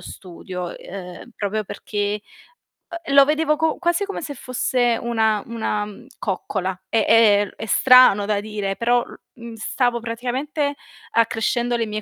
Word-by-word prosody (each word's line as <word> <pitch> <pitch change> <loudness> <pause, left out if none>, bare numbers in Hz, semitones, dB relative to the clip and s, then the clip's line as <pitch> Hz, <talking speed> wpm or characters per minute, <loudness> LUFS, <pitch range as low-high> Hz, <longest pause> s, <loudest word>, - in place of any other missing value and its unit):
studio, 180 -1 -8
ehm, 185 +5 -10
proprio 210 +1 -2
perché, 205 +1 -3 0.8
ehm, 275 - -2
lo 280 0 +8
vedevo 305 +1 +1
co 320 0 0
quasi 345 +2 0
come 400 - -5
se 290 - -5
fosse 245 -2 0
una 220 -3 +1
una, 220 -2 -2
mhmm, 210 +4 -12
coccola. 190 -1 -3
È 225 - +2
è 205 -3 +5
è - - -6
strano 250 -3 +6
da 210 0 0
dire, 205 -2 -3
però 240 +1 +2
l - - -12 0.2
mhmm, 235 -1 -10
stavo 240 +2 0
praticamente 255 +6 -3 0.4
accrescendo 230 +1 +1
le 230 - 0
mie 215 0 -4
230 Hz, 150 wpm, -22 LUFS, 205-250 Hz, 0.8 s, lo